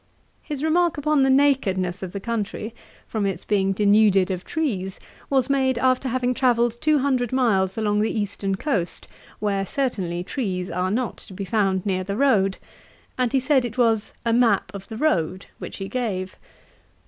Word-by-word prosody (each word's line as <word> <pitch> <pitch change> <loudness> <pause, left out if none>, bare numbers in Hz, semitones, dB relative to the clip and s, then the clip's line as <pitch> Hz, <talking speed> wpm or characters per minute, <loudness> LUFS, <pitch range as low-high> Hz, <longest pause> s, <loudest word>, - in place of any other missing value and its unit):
His 295 -2 -5
remark 340 +1 +2
upon 300 0 +2
the 270 - +4
nakedness 220 -10 +2
of 185 -2 -5
the 200 - -5
country, 220 0 -3 0.3
from 210 -3 -1
its 195 - -4
being 195 -2 +1
denuded 200 -1 +4
of 180 -1 -3
trees, 200 -12 -2 0.3
was 265 -2 +2
made 265 -2 +1
after 255 +1 +2
having 250 0 0
travelled 240 -2 +1
two 310 -1 +3
hundred 260 -4 0
miles 205 -7 +1
along 210 -1 +1
the 215 - +1
eastern 205 -2 -2
coast, 195 - -2 0.3
where 200 -2 0
certainly 190 -7 -2
trees 185 -6 -3
are 180 +2 -1
not 240 +4 -1
to 190 - -10
be 195 - -4
found 190 -2 0
near 185 -2 0
the 200 +2 -4
road; 200 -8 +3 0.6
and 250 -2 0
he 270 - +3
said 265 0 +2
it 240 0 -5
was 225 -3 +2
'a 230 - +2
map 225 -6 +3
of 195 -1 -8
the 220 - -7
road' 185 - 0
which - - -7
he 195 - -5
gave. 195 -5 -3
220 Hz, 175 wpm, -23 LUFS, 195-260 Hz, 0.6 s, the